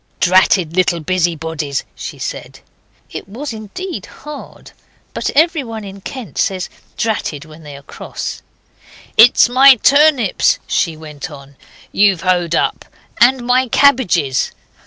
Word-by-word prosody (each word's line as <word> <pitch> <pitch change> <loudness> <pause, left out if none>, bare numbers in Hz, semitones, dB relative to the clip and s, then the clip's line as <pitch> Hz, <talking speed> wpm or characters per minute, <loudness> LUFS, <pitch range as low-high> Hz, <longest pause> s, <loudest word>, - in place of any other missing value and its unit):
'Dratted 185 -2 +3
little 180 -2 +1
busybodies,' 160 -4 -2
she - - -8
said. - - -7 0.5
It - - -8
was 250 +5 -6
indeed 275 - -7
hard, 300 -1 -11 0.4
but - - -2
everyone 280 - +1
in 195 0 -10
Kent 255 +2 -8
says 185 -2 -1 0.3
'dratted' 205 -9 -2
when 155 +1 -14
they 145 -2 -10
are 140 - -15
cross. - - -7 0.7
'It's 235 +2 +6
my 265 +2 +7
turnips,' 280 -3 +3
she 165 -3 -1
went 150 -3 -9
on, 140 -2 -13 0.4
'you've 195 -4 +3
hoed 175 -2 0
up, - - -1 0.3
and 245 +1 +4
my 255 +1 +2
cabbages. 190 - +2
195 Hz, 125 wpm, -16 LUFS, 160-255 Hz, 0.7 s, my